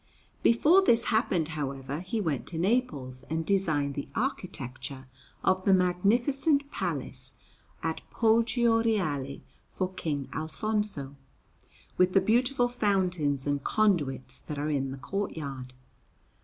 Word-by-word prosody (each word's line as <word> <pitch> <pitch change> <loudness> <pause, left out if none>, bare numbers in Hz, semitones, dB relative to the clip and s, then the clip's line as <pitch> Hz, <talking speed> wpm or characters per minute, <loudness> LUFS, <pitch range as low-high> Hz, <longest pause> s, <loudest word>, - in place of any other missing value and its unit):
Before 320 +11 +5
this 235 -9 +4
happened, 180 -8 +1
however, 140 -2 -4
he 185 +6 -3
went 160 - -2
to 165 - -5
Naples 160 - 0
and 160 +1 -1
designed 155 -8 +1
the 140 - -5
architecture 135 - -4 0.4
of 185 0 +2
the 195 0 +5
magnificent 245 - +2
Palace - - -4 0.5
at - - -2
Poggio 230 0 +3
Reale 150 -12 -1 0.3
for 185 0 -3
King 145 -7 -3
Alfonso, 160 -2 -2 0.8
with 185 0 +3
the 195 - +6
beautiful 245 +5 +2
fountains 185 - 0
and 145 -1 -1
conduits 145 -12 0
that 150 - -7
are 150 +2 -1
in 135 -2 0
the 135 - -6
courtyard. 140 -6 -4
180 Hz, 120 wpm, -28 LUFS, 140-220 Hz, 0.8 s, the